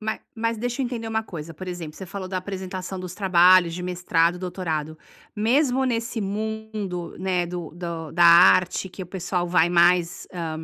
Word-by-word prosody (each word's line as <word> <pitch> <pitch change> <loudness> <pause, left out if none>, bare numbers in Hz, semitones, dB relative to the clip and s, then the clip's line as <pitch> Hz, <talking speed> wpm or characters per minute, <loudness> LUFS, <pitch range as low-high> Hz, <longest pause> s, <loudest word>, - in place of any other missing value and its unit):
Ma 220 0 -3 0.2
mas 230 0 -1
deixa 245 +3 -3
eu - - +1
entender 235 -2 -5
uma 220 0 -1
coisa: 165 -5 -8
por 185 +4 -9
exemplo, 170 -4 -6
você 190 - -8
falou 190 0 -6
da 185 - -3
apresentação 185 0 -5
dos 180 -1 -7
trabalhos 180 -2 +5
de 180 - -5
mestrado 175 -1 +1
e - - -9
doutorado. 160 -4 -4 0.4
Mesmo 255 +4 +2
nesse 235 -2 -2
mundo, 210 -3 -4
né, 180 -1 0
do 175 -2 -6
do 170 -3 -6
da 175 +1 +4
arte, 180 +2 +6
que 185 +1 -8
o - - -8
pessoal 180 0 -2
vai 170 -1 +3
mais, 175 0 +3
hã 170 -3 -4
185 Hz, 185 wpm, -24 LUFS, 175-210 Hz, 0.4 s, arte